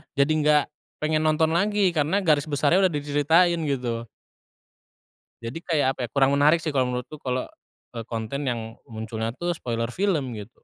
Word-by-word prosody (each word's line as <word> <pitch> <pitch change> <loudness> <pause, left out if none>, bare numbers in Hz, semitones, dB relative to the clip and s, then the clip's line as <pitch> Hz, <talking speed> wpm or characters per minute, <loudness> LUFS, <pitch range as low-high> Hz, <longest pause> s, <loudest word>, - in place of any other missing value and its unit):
jadi 140 +2 +3
enggak 150 -1 +3 0.4
pengen 155 0 +1
nonton 155 +1 +2
lagi 200 +2 +2
karena 160 +5 +1
garis 150 -4 +3
besarnya 155 +6 +3
udah 170 - -6
diceritain 150 +4 +2
gitu. 120 -4 -2 1.4
Jadi 115 +8 -5
kayak 145 -5 +1
apa - - -20
ya, - - -11
kurang 140 0 +3
menarik 150 +4 +4
sih 165 - -2
kalau 130 -4 +1
menurutku 125 +5 -5
kalau, 130 -1 -2 0.5
eee, 115 - -4
konten 115 +5 -4
yang 115 -3 -4
munculnya 110 0 -5
tuh 175 +4 -2
spoiler 115 -3 -3
film 150 - -1
gitu. 105 +4 -12
145 Hz, 165 wpm, -25 LUFS, 125-160 Hz, 1.4 s, menarik